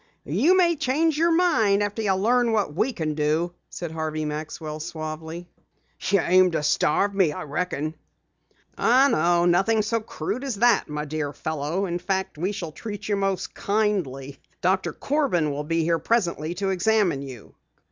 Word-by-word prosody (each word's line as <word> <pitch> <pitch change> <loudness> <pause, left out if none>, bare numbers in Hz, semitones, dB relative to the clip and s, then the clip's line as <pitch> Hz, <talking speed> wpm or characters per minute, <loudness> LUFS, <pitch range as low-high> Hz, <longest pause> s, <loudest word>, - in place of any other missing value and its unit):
"You 265 - +3
may 345 -2 +4
change 305 +3 +1
your 335 +3 +3
mind 225 - +3
after 205 +2 -3
you 195 -3 +1
learn 235 +4 +2
what 205 -9 0
we 225 - +1
can 160 -9 -3
do," 155 +3 0 0.2
said 170 -3 -6
Harvey 155 -1 -3
Maxwell 155 +1 -5
suavely. 160 +2 -6 0.6
"You 200 -1 +4
aim 185 +1 +4
to 155 - -1
starve 175 +6 +2
me, 190 -6 +3
I - - -6
reckon." 155 0 -3 0.9
"Oh, 255 +4 +5
no, 170 +2 +3
nothing 195 +5 +3
so 230 +2 0
crude 215 - -5
as 270 -5 -2
that, 235 -2 +3
my 150 0 -3
dear 145 -1 -3
fellow. 155 +5 -2
In 175 -1 -3
fact, 190 -4 -2
we 185 +4 0
shall 180 -6 -5
treat 205 +4 -7
you 205 - +2
most 195 -1 -2
kindly. 185 -11 -1 0.2
Doctor 185 +1 +1
Corbin 265 - 0
will 145 +1 -3
be 165 +1 0
here 165 0 +1
presently 175 -7 0
to 195 +1 -1
examine 190 -5 +2
you." 130 -6 -10
180 Hz, 170 wpm, -24 LUFS, 155-215 Hz, 0.9 s, Oh